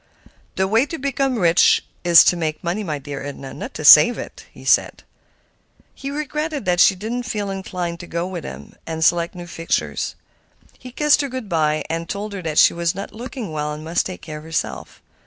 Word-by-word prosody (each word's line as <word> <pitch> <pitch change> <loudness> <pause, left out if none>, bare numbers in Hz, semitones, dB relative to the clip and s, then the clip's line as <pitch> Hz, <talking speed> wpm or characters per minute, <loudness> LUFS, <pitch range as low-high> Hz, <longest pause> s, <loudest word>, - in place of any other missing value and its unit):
"The 190 0 +1
way 225 +7 +2
to 325 - -5
become 270 -2 -1
rich 175 -4 +4 0.2
is 175 -1 +8
to - - +3
make 155 -3 -3
money, 180 +5 -2
my 155 -6 -3
dear 140 0 -7
Edna, 135 -1 -7
not - - -8
to 155 - -5
save 155 +11 +9
it," - - -9
he - - -14
said. - - +2 0.9
He 275 - -7
regretted 300 -1 -3
that 180 -1 +1
she 195 - +6
did 210 +5 -6
not 245 0 -3
feel 205 -3 -3
inclined 180 -3 -4
to 175 - -9
go 170 +1 -3
with 180 -3 -6
him 65 +2 -9
and 160 0 -1
select 170 +1 +2
new 175 -1 -8
fixtures. 165 0 -2 0.6
He 255 - -10
kissed 300 +3 +3
her 280 - -3
good 255 -3 -6
by, 155 -4 +1
and 165 +1 -4
told 205 +1 -4
her 165 -6 -4
she - - +6
was 170 +1 -1
not 195 +1 -7
looking 235 - -7
well 150 -1 -3
and 150 +1 -8
must 165 +2 -1
take 185 - -9
care 155 -1 -7
of - - -14
herself. 155 - -5
175 Hz, 210 wpm, -21 LUFS, 160-225 Hz, 0.9 s, save